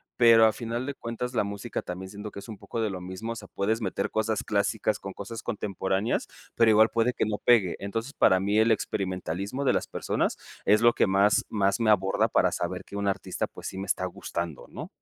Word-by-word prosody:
Pero, 115 Hz, -2 st, +7 dB
a 110 Hz, -, +4 dB
final 120 Hz, +3 st, -4 dB
de 140 Hz, -, -3 dB
cuentas, 125 Hz, 0 st, -5 dB
la 115 Hz, -, +2 dB
música 100 Hz, +3 st, -4 dB
también, 95 Hz, +1 st, -7 dB
siento 105 Hz, +1 st, -7 dB
que 100 Hz, -, -8 dB
es 100 Hz, -, -11 dB
un 110 Hz, -, -8 dB
poco 115 Hz, -, -6 dB
de 110 Hz, -, 0 dB
lo 95 Hz, -2 st, -5 dB
mismo, 95 Hz, +6 st, -5 dB
o -, -, -11 dB
sea, 105 Hz, -3 st, -9 dB
puedes 110 Hz, +4 st, -1 dB
meter 100 Hz, -1 st, -2 dB
cosas 110 Hz, -1 st, 0 dB
clásicas 105 Hz, +1 st, 0 dB
con 95 Hz, -, -7 dB
cosas 110 Hz, +3 st, -7 dB
contemporáneas, 100 Hz, -2 st, -1 dB, 0.3 s
pero 115 Hz, -1 st, +5 dB
igual 110 Hz, +1 st, +6 dB
puede 115 Hz, +2 st, +2 dB
que -, -, 0 dB
no 105 Hz, -1 st, -1 dB
pegue. 105 Hz, -8 st, +4 dB
Entonces, 115 Hz, +7 st, -4 dB
para 95 Hz, -8 st, +4 dB
mí 100 Hz, +2 st, 0 dB
el 115 Hz, +1 st, +4 dB
experimentalismo 100 Hz, +4 st, -2 dB
de -, -, +4 dB
las -, -, -1 dB
personas -, -, -1 dB, 0.3 s
es 105 Hz, +1 st, +4 dB
lo 120 Hz, 0 st, +6 dB
que -, -, +2 dB
más 100 Hz, +2 st, +3 dB
más 100 Hz, 0 st, +1 dB
me 110 Hz, -, +3 dB
aborda 95 Hz, -2 st, +3 dB
para -, -, +3 dB
saber -, -, -3 dB
que 100 Hz, -, -10 dB
un 100 Hz, 0 st, -1 dB
artista 95 Hz, -1 st, -1 dB
pues, -, -, -9 dB
sí 95 Hz, -, -6 dB
me 95 Hz, 0 st, -5 dB
está 95 Hz, -, 0 dB
gustando, 85 Hz, -3 st, -5 dB
¿no? -, -, -7 dB
105 Hz, 230 wpm, -27 LUFS, 95-115 Hz, 0.3 s, Pero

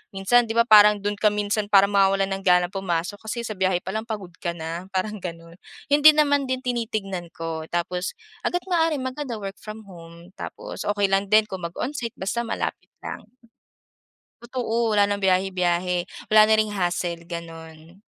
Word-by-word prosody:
minsan 230 Hz, +5 st, +3 dB
di 225 Hz, -, -4 dB
ba 235 Hz, -, +5 dB
parang 210 Hz, -2 st, +6 dB
dun 205 Hz, 0 st, -2 dB
ka 215 Hz, -, +4 dB
minsan 210 Hz, 0 st, -1 dB
para 200 Hz, -1 st, +6 dB
mawawalan 195 Hz, -1 st, +3 dB
ng -, -, -14 dB
ganang 180 Hz, -1 st, +3 dB
pumasok 190 Hz, 0 st, -3 dB
kasi 235 Hz, +2 st, -5 dB
sa 225 Hz, -, -5 dB
biyahe 185 Hz, -2 st, 0 dB
palang 215 Hz, +4 st, -4 dB
pagod 205 Hz, -6 st, -5 dB
ka 170 Hz, -2 st, -3 dB
na? 165 Hz, +2 st, -6 dB
Parang 210 Hz, +3 st, -2 dB
ganun, 170 Hz, -1 st, -9 dB, 0.3 s
yun 290 Hz, -, +5 dB
din 305 Hz, +1 st, +8 dB
naman 285 Hz, -2 st, +1 dB
din 260 Hz, 0 st, -2 dB
tinitignan 215 Hz, -7 st, -3 dB
ko 160 Hz, -1 st, -5 dB
tapos, 180 Hz, +2 st, -3 dB, 0.3 s
hangga't 355 Hz, 0 st, -1 dB
maaari 325 Hz, -2 st, +2 dB
maganda 260 Hz, -1 st, -4 dB
work 200 Hz, -2 st, -7 dB
from 215 Hz, +1 st, -9 dB
home, 170 Hz, -2 st, -14 dB
tapos -, -, -7 dB
okey 205 Hz, -1 st, +1 dB
lang 195 Hz, +1 st, +2 dB
din 215 Hz, +2 st, +5 dB
kung 190 Hz, -1 st, -6 dB
mag 170 Hz, -, -6 dB
onsite 245 Hz, -4 st, -3 dB
basta 205 Hz, +5 st, -2 dB
malapit -, -, -4 dB
lang. -, -, -7 dB, 1.2 s
Totoo 235 Hz, -2 st, -1 dB
wala 205 Hz, -, +5 dB
ng 200 Hz, 0 st, 0 dB
biyahe-biyahe 180 Hz, -2 st, +1 dB, 0.2 s
wala 215 Hz, 0 st, +8 dB
na 220 Hz, -, +5 dB
ring 215 Hz, -1 st, +1 dB
hassle 175 Hz, -3 st, -2 dB
ganun. 165 Hz, 0 st, -9 dB
195 Hz, 175 wpm, -24 LUFS, 180-220 Hz, 1.2 s, din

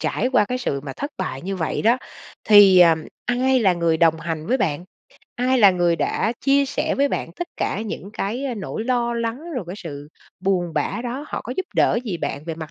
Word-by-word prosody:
trải 250 Hz, -, 0 dB
qua 215 Hz, -5 st, +4 dB
cái 250 Hz, +4 st, -3 dB
sự 140 Hz, -, -2 dB
mà 135 Hz, -1 st, -7 dB
thất 285 Hz, +2 st, -4 dB
bại 150 Hz, -7 st, -4 dB
như 195 Hz, +1 st, -3 dB
vậy 160 Hz, -, -2 dB
đó, 235 Hz, +4 st, +4 dB, 0.5 s
thì, 200 Hz, -3 st, +8 dB
à, 165 Hz, -2 st, +7 dB, 0.3 s
ai 255 Hz, +1 st, +2 dB
là 190 Hz, -4 st, +4 dB
người 170 Hz, -2 st, +1 dB
đồng 160 Hz, -1 st, +3 dB
hành 160 Hz, -1 st, -4 dB
với 260 Hz, -, +2 dB
bạn? 165 Hz, -1 st, -1 dB, 0.5 s
Ai 255 Hz, +1 st, +1 dB
là 200 Hz, -4 st, +7 dB
người 175 Hz, -2 st, +1 dB
đã 225 Hz, -, 0 dB
chia 280 Hz, 0 st, +3 dB
sẻ -, -, -1 dB
với 280 Hz, +1 st, +2 dB
bạn -, -, -3 dB
tất 350 Hz, 0 st, -6 dB
cả 200 Hz, -, -2 dB
những 205 Hz, -2 st, -6 dB
cái, 225 Hz, +8 st, -3 dB
ơ, 255 Hz, -3 st, -2 dB
nỗi 215 Hz, +2 st, -5 dB
lo 240 Hz, -1 st, 0 dB
lắng, 235 Hz, +9 st, -4 dB
rồi 235 Hz, -8 st, -3 dB
cái 180 Hz, +3 st, -7 dB
sự 145 Hz, -5 st, -8 dB, 0.3 s
buồn 180 Hz, -3 st, 0 dB
bã -, -, -1 dB
đó, 260 Hz, +5 st, -4 dB
họ -, -, -4 dB
có 245 Hz, -, -4 dB
giúp 375 Hz, -, -2 dB
đỡ 230 Hz, -, +3 dB
gì 190 Hz, -6 st, -3 dB
bạn 145 Hz, -2 st, -4 dB
về 165 Hz, -1 st, -4 dB
mặt 160 Hz, -1 st, -8 dB
205 Hz, 230 wpm, -22 LUFS, 170-250 Hz, 0.5 s, thì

